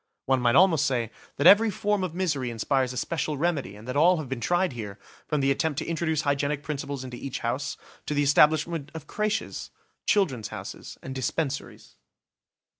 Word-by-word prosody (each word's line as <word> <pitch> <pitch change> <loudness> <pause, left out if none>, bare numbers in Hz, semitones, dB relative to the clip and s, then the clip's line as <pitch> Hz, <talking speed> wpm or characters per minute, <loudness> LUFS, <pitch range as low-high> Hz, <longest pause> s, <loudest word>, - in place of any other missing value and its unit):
One 130 -1 +2
might 120 -1 +3
almost 165 -6 +5
say 120 -5 -1 0.3
that 145 - 0
every 220 +3 +8
form 205 0 0
of 175 -3 -3
misery 150 -9 -1
inspires 125 +3 0
a 125 - -6
special 150 +2 -2
remedy 150 - -1
and 105 +3 -12
that 125 - -3
all 175 +5 +5
have 155 -4 -4
been 130 -2 -4
tried 175 +4 +1
here, 105 -4 -6 0.3
from 150 -2 0
the 135 0 +3
attempt 145 +1 0
to - - -2
introduce 160 -2 0
hygienic 145 0 0
principles 140 -2 -4
into 125 -1 -7
each 135 0 -5
house, 130 +5 -2 0.3
to 150 - -1
the 145 - +3
establishment 150 +1 +3
of 160 -2 -7
crêches, 215 +5 -2 0.4
"Children's 135 - +2
Houses", - - -8
and 130 - -6
dispensaries. 135 +2 -3
145 Hz, 185 wpm, -26 LUFS, 130-165 Hz, 0.4 s, every